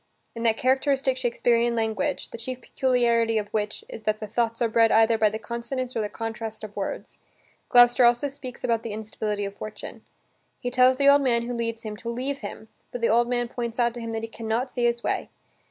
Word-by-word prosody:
In 230 - -7
that 225 -1 +2
characteristic 265 +1 +2
Shakespearean 240 -1 +1
language, 220 -4 -1
the - - -6
chief 255 +2 -5
peculiarity 235 -3 +1
of 205 -1 -2
which 210 -1 -3
is - - -9
that 215 0 -1
the 215 - -4
thoughts 230 +1 -1
are 235 - +2
bred 225 0 +4
either 225 +1 +5
by 215 -1 +3
the 215 - -4
consonance 235 +3 -5
or 225 - 0
the 210 - -2
contrasts 225 -1 -5
of 210 -1 -8
words, 200 - -5 0.5
Gloucester 245 0 +6
also 240 +3 +4
speaks 265 -3 -9
about 230 -1 +1
the 225 -2 -5
instability 210 -1 -3
of 200 0 -6
fortune. 215 0 -8 0.5
He 245 - -4
tells 255 +1 +5
the 280 0 +3
old 285 0 +7
man 235 -3 +2
who 245 +1 -4
leads 230 -1 -3
him 215 -1 -5
to 230 - -6
leave 260 +4 -3
him, 215 +1 -8 0.2
but 245 - -5
the 230 - +2
old 235 +2 +3
man 240 -1 0
points 235 -1 -4
out 240 -1 +2
to 240 - -7
him 230 0 -4
that 225 0 -3
he - - -3
can 225 0 -8
not 240 +4 -1
see 245 -2 0
his 235 0 +1
way. - - -1
235 Hz, 225 wpm, -25 LUFS, 220-245 Hz, 0.5 s, old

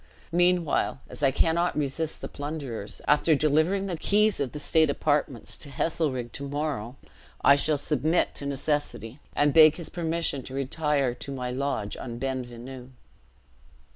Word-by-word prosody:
Meanwhile, 175 -5 +2
as - - -8
I 140 - +5
cannot 165 +6 +1
resist 150 +2 -2
the - - -4
plunderers, 140 -8 -6
after 150 +2 +4
delivering 155 +7 +2
the 180 -4 -3
keys 210 +1 +3
of 140 -3 -1
the - - -7
state 160 +1 +3
apartments 145 -4 0
to 145 - -10
Heselrigge 135 -4 -1
to 140 - -5
morrow, 140 -5 -3 0.5
I 140 - +8
shall 145 +1 +2
submit 150 +4 +1
to 140 - -3
necessity, 140 -3 -2 0.2
and 145 -1 +3
beg 155 -1 +8
his 170 -2 -6
permission 165 -4 -1
to 130 +1 -9
retire 140 -1 0
to 140 - -7
my 125 -2 -3
lodge 130 -5 -2
on 120 -2 -6
Ben 130 0 -2
Venu." 125 +1 -10
145 Hz, 155 wpm, -27 LUFS, 130-160 Hz, 0.5 s, I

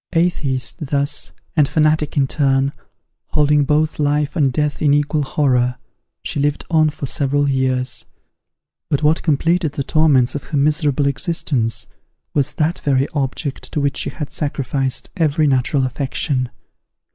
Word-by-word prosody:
Atheist, 155 -6 0
thus, 140 +1 0 0.2
and 150 -3 +4
fanatic 155 0 +1
in 140 - +4
turn, 135 -1 +1 0.6
holding 150 -1 +3
both 155 +2 +1
life 145 +1 +1
and 140 -6 +2
death 150 +3 -1
in 145 -2 +4
equal 145 +1 +1
horror, 125 -3 +1 0.5
she - - -3
lived 145 +1 0
on 155 -2 +4
for 150 - -6
several 145 +1 0
years. 130 -1 -1 0.8
But 145 +1 0
what 155 +2 +3
completed 165 +1 +1
the 140 - -2
torments 140 -5 +3
of 145 - -5
her 150 - -3
miserable 145 -1 +2
existence, 140 -5 -1 0.5
was 140 -3 0
that 160 +3 0
very 135 -1 +1
object 140 0 -3
to - - 0
which 140 -1 0
she - - -1
had 150 -2 -6
sacrificed 135 -3 -2
every 155 -2 +2
natural 135 0 +2
affection. 130 0 -1
145 Hz, 145 wpm, -19 LUFS, 135-150 Hz, 0.8 s, and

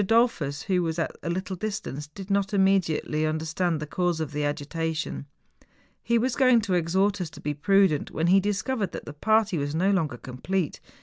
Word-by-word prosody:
Dollfus, 195 - +2
who 185 -2 +1
was 165 -1 -2
at 165 - -2
a - - -4
little 185 +2 -2
distance, 180 -8 -4
did 195 +6 -9
not 200 0 +1
immediately 190 -6 +2
under¬ 155 0 0
stand 165 0 0
the 150 - -4
cause 175 +1 -1
of 155 -2 -3
the 150 0 -2
agitation. 155 +1 -3 0.7
He 235 - +2
was 245 +2 0
going 255 -4 +5
to 200 -3 -2
exhort 190 +4 +1
us 175 - -3
to 145 - -13
be 150 - -2
prudent, 190 0 +3
when 160 - -1
he 185 +3 +6
discovered 205 +1 -1
that - - -6
the 150 - -7
party 215 +2 +2
was 145 +1 -2
no 190 +5 +2
longer 160 -10 0
complete. 150 +9 -3
180 Hz, 195 wpm, -26 LUFS, 155-200 Hz, 0.7 s, he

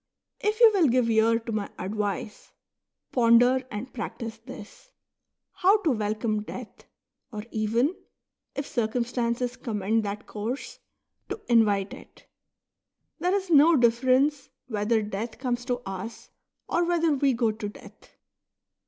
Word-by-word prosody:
If 425 +2 -1
you 460 -2 +8
will 360 -6 +4
give 245 -2 +2
ear 225 +1 +4
to 230 0 -6
my 215 -2 -2
advice, 210 +2 -4 0.6
ponder 245 +2 +4
and 225 +5 -6
practise 225 0 -6
this, 225 - -12 0.3
— - - -59
how 390 +4 +6
to 320 - +3
welcome 215 -1 -1
death, 225 +2 -9 0.5
or 210 -2 -6
even, 230 - +1 0.6
if 280 - -3
circum 235 -3 -1
stances 240 0 -2
commend 220 -3 -1
that 205 0 -5
course, 225 +6 -5 0.5
to - - -4
invite 210 -4 +3
it. - - -14 0.9
There 360 +2 +1
is 385 -3 -2
no 315 +2 +7
difference 255 +4 +2 0.2
whether 220 -1 0
death 215 +2 -5
comes 245 -2 -2
to 250 -1 -2
us, 195 +4 -7 0.4
or 345 - +1
whether 335 -2 +2
we 275 -1 +2
go 230 -2 +1
to 215 -1 -5
death. - - -16
235 Hz, 135 wpm, -26 LUFS, 215-260 Hz, 0.9 s, you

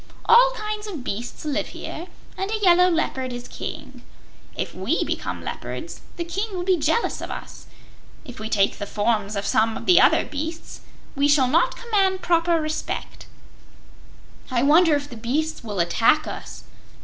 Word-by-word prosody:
All - - +7
kinds 425 -1 -4
of 335 -11 -6
beasts 235 +6 -5
live 295 -2 -1
here, 340 +3 -7 0.3
and 385 - -3
a 440 - -1
yellow 360 -3 +5
leopard 265 -6 -1
is 245 0 -7
King. - - -8 0.5
If - - -4
we 200 - 0
become - - -4
leopards, - - -6 0.2
the 340 - -2
King 350 +5 -2
will 360 -1 -3
be 370 0 +3
jealous 320 +8 0
of - - -6
us. - - -8 0.6
If 250 -6 -10
we 220 0 -5
take 200 -3 +1
the 205 - -4
forms 210 -1 0
of 200 0 -2
some 220 +2 +2
of - - -8
the 365 - +6
other - - +4
beasts, 320 +3 -6 0.3
we 280 +1 +2
shall 285 -3 +4
not 335 - +2
command 390 -5 +1
proper 335 -1 +2
respect." 310 0 -4 1.2
"I 250 -2 +1
wonder 315 +2 +5
if 285 0 -3
the 245 - -10
beasts 275 +8 -2
will 205 -4 -4
attack 230 - +3
us?" - - -8
310 Hz, 170 wpm, -23 LUFS, 240-360 Hz, 1.2 s, All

